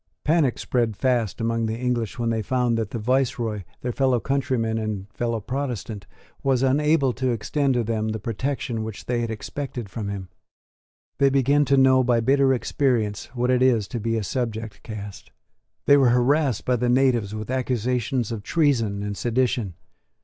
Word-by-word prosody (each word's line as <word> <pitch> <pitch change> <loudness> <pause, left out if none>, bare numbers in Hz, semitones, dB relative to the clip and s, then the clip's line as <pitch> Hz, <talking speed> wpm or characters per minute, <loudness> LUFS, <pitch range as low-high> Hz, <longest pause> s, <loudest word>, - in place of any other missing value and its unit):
Panic 150 -5 +2
spread 115 -5 -1
fast 120 -6 0
among 115 0 0
the 110 +1 -3
English 120 -3 -2
when 115 -1 0
they 110 -1 0
found 125 +1 +1
that 110 -3 -2
the 115 - -4
viceroy, 115 -2 0 0.2
their 125 - -2
fellow 130 -1 +2
countryman 120 -4 -1
and 105 -3 -3
fellow 115 -1 -1
Protestant, 115 -5 -4 0.3
was 135 -2 +1
unable 140 0 +3
to 130 +1 -1
extend 130 +4 0
to 120 - +1
them 110 -1 -1
the 110 - -2
protection 115 +1 -3
which 110 -2 -7
they 120 -1 0
had 115 - -2
expected 120 0 -5
from 100 +1 -5
him. 95 -2 -6 0.9
They 140 -1 +5
began 140 +2 +3
to 140 +1 +3
know 130 -1 +5
by 120 -2 +2
bitter 135 +3 +3
experience 120 -5 0
what 125 +1 +1
it 125 0 +2
is 120 -6 +3
to 120 - -3
be 115 +1 -1
a 110 - -2
subject 110 -1 -4
caste. 105 -3 -8 0.5
They 145 - +6
were 135 -3 +5
harassed 125 +1 +2
by 125 -1 +2
the 120 +1 0
natives 120 -5 +2
with 110 +3 -5
accusations 125 -2 -1
of 110 -3 -4
treason 115 -9 +1
and 105 0 -3
sedition. 120 -4 0
120 Hz, 175 wpm, -24 LUFS, 110-130 Hz, 0.9 s, They